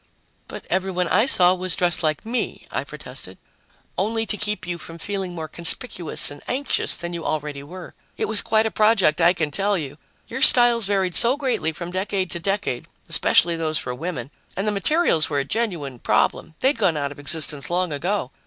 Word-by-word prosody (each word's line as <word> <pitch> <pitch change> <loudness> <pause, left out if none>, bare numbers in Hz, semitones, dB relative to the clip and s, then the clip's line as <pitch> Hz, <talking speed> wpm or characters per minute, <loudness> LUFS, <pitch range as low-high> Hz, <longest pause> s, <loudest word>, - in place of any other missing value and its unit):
"But - - -9
everybody 185 -2 -1
I 215 +7 +3
saw 180 -8 +5
was 185 -1 -2
dressed 175 -2 +2
like 155 +1 -1
me!" 240 +2 -3
I - - -2
protested. - - -7 0.6
"Only 225 +3 -1
to 215 - -1
keep 210 -2 -3
you 175 0 -4
from 165 0 -10
feeling 190 +1 -4
more 160 -2 -5
conspicuous 170 0 +3
and 145 - -11
anxious 275 +3 0
than 175 0 -6
you 170 -1 -5
already 150 -2 -3
were. 175 +5 -10 0.2
It - - -1
was 215 0 +1
quite 220 -1 +1
a 220 - -1
project, 195 -8 +3
I 170 +2 +5
can 155 -4 -2
tell 200 +5 0
you 145 -2 -7 0.3
your 255 +3 -5
styles 240 -5 +6
varied 190 -3 0
so 245 +9 +5
greatly 255 - -1
from 170 +2 -7
decade 190 0 -2
to 170 - -4
decade, 195 -9 -2 0.2
especially 170 0 +2
those 160 -1 -2
for 125 - -4
women 140 -2 -6 0.3
and 195 - -1
the 210 - +1
materials 205 - +2
were 145 - -1
a 140 - 0
genuine 160 - -3
problem; 160 - 0
they'd 265 -2 +2
gone 180 -7 +2
out 140 -1 -2
of 145 - -11
existence 145 -1 +2
long 175 -2 -1
ago. 175 -1 -2
180 Hz, 195 wpm, -22 LUFS, 155-210 Hz, 0.6 s, styles